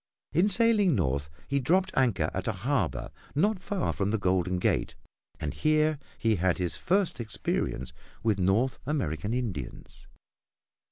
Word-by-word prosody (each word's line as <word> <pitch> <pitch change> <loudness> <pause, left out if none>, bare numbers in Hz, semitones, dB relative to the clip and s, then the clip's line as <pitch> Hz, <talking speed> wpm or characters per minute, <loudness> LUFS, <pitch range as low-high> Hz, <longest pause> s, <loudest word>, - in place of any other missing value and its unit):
In 175 +7 +4
sailing 210 - +4
north 70 - 0 0.2
he 140 0 +1
dropped 185 +8 +2
anchor 110 -12 +2
at 95 - -3
a - - +2
harbor 130 - 0 0.2
not 205 +7 +2
far 195 -1 -1
from 100 0 -1
the 110 - +1
Golden 90 -2 +1
Gate, - - 0 0.4
and 75 -2 -3
here 155 -1 +2 0.2
he 110 -2 +2
had 90 0 +2
his 90 -2 -2
first 190 -5 +1
experience 100 - -2 0.3
with 110 -4 +2
North 110 +7 +2
American 100 - -1
Indians. 105 - -5
115 Hz, 145 wpm, -28 LUFS, -, 0.4 s, In